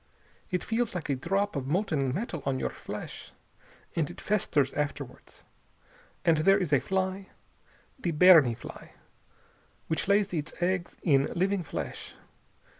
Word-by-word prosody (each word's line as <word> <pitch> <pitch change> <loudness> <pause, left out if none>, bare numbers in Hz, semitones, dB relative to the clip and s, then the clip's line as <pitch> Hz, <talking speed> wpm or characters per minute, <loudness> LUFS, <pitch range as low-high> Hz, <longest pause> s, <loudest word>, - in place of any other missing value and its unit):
It 180 -1 -1
feels 230 -2 -1
like 170 -4 -4
a - - +2
drop 195 +9 -1
of 135 -2 -3
molten 150 -5 0
metal 170 - -3
on 135 -1 0
your - - -2
flesh. - - -8 0.6
And 160 -4 0
it - - -10
festers 155 -9 +1
afterwards. 145 -1 -5 0.8
And 165 -2 +5
there 195 +6 +5
is 180 -7 -1
a 140 - +6
fly, 190 +2 -2 0.7
the 180 - -1
berni 160 -7 +7
fly, - - -11 0.9
which 160 - -2
lays 200 -1 +3
its 155 -1 -3
eggs 180 0 -1
in 140 -5 +4
living 190 +2 +1
flesh. 165 - -6
175 Hz, 140 wpm, -29 LUFS, 145-195 Hz, 0.9 s, berni